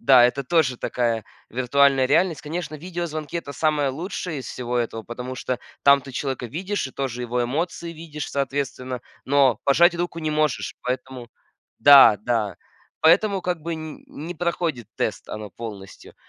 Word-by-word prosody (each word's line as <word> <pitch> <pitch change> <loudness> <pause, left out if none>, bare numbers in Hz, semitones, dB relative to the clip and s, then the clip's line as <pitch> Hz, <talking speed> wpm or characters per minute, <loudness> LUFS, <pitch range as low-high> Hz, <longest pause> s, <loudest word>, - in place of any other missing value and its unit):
Да, 130 -3 +7
это 135 +3 +1
тоже 145 -4 +2
такая 115 -3 -1 0.3
виртуальная 135 +2 +3
реальность. 165 +3 +2
Конечно, 160 +1 -5
видеозвонки- 165 -2 -5
это 155 -4 -5
самое 150 0 +1
лучшее 165 +2 -4
из 130 - -7
всего 125 0 -3
этого, 115 -1 -2
потому 125 +3 -6
что 130 -1 -3 0.2
там 140 -1 +6
ты 135 - -10
человека 130 -2 -3
видишь 185 - -3
и 130 - -11
тоже 125 -3 -3
его 120 0 -1
эмоции 165 +7 -2
видишь, 155 -2 -7
соответственно, 130 -2 -2 0.2
но 135 -3 +4
пожать 170 +5 +5
руку 175 -1 -3
не 155 -1 -1
можешь. 150 -3 0
Поэтому 125 -1 -4 0.5
Да, 135 -7 +9
да. 110 -5 0 0.5
Поэтому 195 +5 +4
как 175 -2 -2
бы 170 +1 -3
нь 155 -1 -8
не 165 +4 -7
проходит 165 - -2
тест 110 - -2
она 105 -1 -6
полностью. 100 -3 -9
140 Hz, 160 wpm, -23 LUFS, 125-160 Hz, 0.5 s, Да